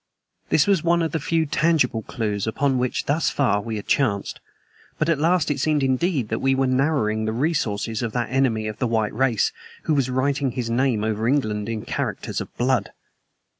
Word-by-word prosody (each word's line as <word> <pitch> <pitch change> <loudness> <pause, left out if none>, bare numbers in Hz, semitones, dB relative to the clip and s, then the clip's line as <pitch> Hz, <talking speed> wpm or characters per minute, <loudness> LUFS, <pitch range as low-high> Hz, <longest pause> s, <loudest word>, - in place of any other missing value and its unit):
This 150 - +4
was 195 -5 +2
one 170 0 +2
of 160 - -1
the 160 - -1
few 165 +2 0
tangible 150 -6 +1
clews 105 -3 -3
upon 130 +3 +1
which 125 0 -1
thus 150 +3 +1
far 115 -8 +1
we 110 +1 -4
had 105 - -5
chanced; 110 -8 0 0.6
but 155 - 0
at 165 -4 +2
last 165 -1 +2
it 140 - -2
seemed 150 0 +1
indeed 135 - 0
that 110 - -1
we 135 0 +2
were 135 0 +2
narrowing 130 -5 +1
the 110 - -1
resources 115 -5 -1
of 115 -2 -2
that 120 -1 -2
enemy 125 -5 +1
of 110 - -6
the 125 - +1
white 110 -2 0
race 120 -2 +1 0.3
who 155 - +1
was 135 -3 +1
writing 135 0 0
his 120 -3 -3
name 120 -3 +1
over 110 +1 -1
England 110 -6 0
in 110 -2 -3
characters - - -3
of - - -8
blood. 130 +2 +1
130 Hz, 200 wpm, -23 LUFS, 110-145 Hz, 0.6 s, This